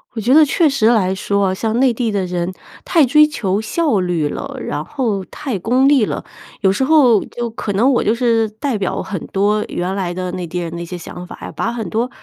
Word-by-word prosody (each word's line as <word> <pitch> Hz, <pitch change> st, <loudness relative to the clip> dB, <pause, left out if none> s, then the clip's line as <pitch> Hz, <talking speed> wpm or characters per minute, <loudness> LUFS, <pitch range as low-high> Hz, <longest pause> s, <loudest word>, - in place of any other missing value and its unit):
我 -, -, -3 dB
觉 240 Hz, +5 st, +2 dB
得 310 Hz, +2 st, +8 dB
确 310 Hz, +3 st, +3 dB
实 270 Hz, -6 st, +2 dB
来 205 Hz, -6 st, +3 dB
说 200 Hz, 0 st, 0 dB
啊， -, -, -1 dB
像 220 Hz, +4 st, -1 dB
内 260 Hz, -2 st, +4 dB
地 230 Hz, -1 st, -1 dB
的 195 Hz, -2 st, -1 dB
人 175 Hz, 0 st, -2 dB, 0.3 s
太 325 Hz, -5 st, +3 dB
追 300 Hz, +4 st, +5 dB
求 205 Hz, -8 st, -1 dB
效 280 Hz, -, 0 dB
率 175 Hz, -4 st, 0 dB
了， -, -, -6 dB
然 -, -, -4 dB
后 225 Hz, -9 st, -2 dB
太 245 Hz, -2 st, -5 dB
功 250 Hz, +8 st, +2 dB
利 280 Hz, -5 st, +4 dB
了。 -, -, -4 dB, 0.4 s
有 190 Hz, -, +4 dB
时 205 Hz, +7 st, 0 dB
候 260 Hz, -7 st, +5 dB
就 240 Hz, 0 st, -5 dB
可 215 Hz, -2 st, -4 dB
能 240 Hz, +8 st, +3 dB
我 245 Hz, -, +2 dB
就 215 Hz, -, +2 dB
是 230 Hz, -3 st, +1 dB
代 225 Hz, +4 st, -3 dB
表 200 Hz, -3 st, -2 dB
很 190 Hz, -4 st, -6 dB
多 210 Hz, +2 st, +1 dB
原 180 Hz, +2 st, -3 dB
来 185 Hz, -3 st, -2 dB
的 185 Hz, 0 st, -4 dB
内 180 Hz, -1 st, -5 dB
地 180 Hz, -, -5 dB
人 170 Hz, -2 st, -4 dB
的 170 Hz, -, -5 dB
一 170 Hz, -, -5 dB
些 180 Hz, +1 st, -6 dB
想 180 Hz, +1 st, -9 dB
法 -, -, -9 dB
啊， -, -, -7 dB
把 230 Hz, -, -2 dB
很 230 Hz, -5 st, -4 dB
多 235 Hz, +3 st, 0 dB
215 Hz, 260 characters per minute, -18 LUFS, 185-250 Hz, 0.4 s, 得